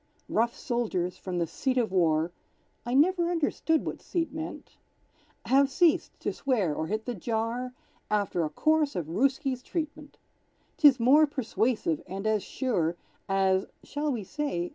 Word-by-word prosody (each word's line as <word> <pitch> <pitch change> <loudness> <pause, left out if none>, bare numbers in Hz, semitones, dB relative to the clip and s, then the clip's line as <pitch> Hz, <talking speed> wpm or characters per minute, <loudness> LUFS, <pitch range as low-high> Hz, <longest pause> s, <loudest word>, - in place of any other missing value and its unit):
Rough 235 +2 +1
soldiers, 210 -8 -1
from 185 -2 -5
the 170 - +1
seat 260 - -2
of 230 -6 +1
war, 165 -2 +2 0.6
(I 245 - 0
never 345 +4 +4
understood 325 -1 0
what - - -5
"seat" 330 -4 -2
meant) 315 0 -7 0.7
Have 275 +1 +4
ceased 325 +3 +2
to - - -1
swear 220 - 0
or 155 +2 -3
hit 215 +3 -2
the 245 - -2
jar 235 +4 -2 0.3
After 200 -5 0
a 155 - -1
course 310 - +1
of 175 - -2
Rooski's 265 - 0
treatment. 305 -1 -5 0.6
'Tis 285 -5 +6
more 285 +6 +6
persuasive 230 - -1
and 195 +2 -5
as 215 -1 +2
sure 175 - -1 0.3
As 190 0 +2 0.2
(shall 295 +1 -2
we 230 -5 -3
say?) 185 -8 -3
240 Hz, 150 wpm, -28 LUFS, 190-290 Hz, 0.7 s, Tis